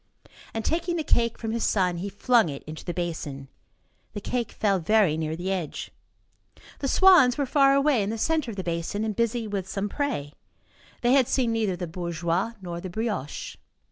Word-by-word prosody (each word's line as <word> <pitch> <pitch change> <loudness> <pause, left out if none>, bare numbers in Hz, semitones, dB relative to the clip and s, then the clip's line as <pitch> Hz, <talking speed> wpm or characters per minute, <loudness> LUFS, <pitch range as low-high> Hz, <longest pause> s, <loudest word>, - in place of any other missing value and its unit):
And, 225 -1 -4
taking 340 +1 0
the 325 - -1
cake 235 -5 +1
from 225 -1 -4
his 230 0 -1
son, 180 -4 +1
he 195 +4 -4
flung 225 -1 +3
it 140 -1 -7
into 155 +1 -8
the 175 - -3
basin. 155 -6 -4 0.6
The - - -4
cake 240 +2 -2
fell 200 -3 +1
very 190 -2 +3
near 160 0 -2
the 180 +3 -3
edge. 180 -6 -4 0.9
The 275 - -1
swans 330 -7 +6
were 285 - +1
far 275 0 +4
away, 275 -4 +3
in 200 - -1
the 225 - -3
centre 310 +2 0
of 210 - -7
the 190 - -3
basin, 170 +4 -2
and 215 -2 -2
busy 230 0 0
with 195 -2 -3
some 200 +1 -2
prey. 200 - -2 0.7
They 240 - +3
had 265 -3 +5
seen 245 -3 +1
neither 220 -5 0
the 175 0 -4
bourgeois 170 +4 -2
nor 170 -1 -5
the 185 - -6
brioche. 205 - -4
205 Hz, 195 wpm, -26 LUFS, 175-240 Hz, 0.9 s, swans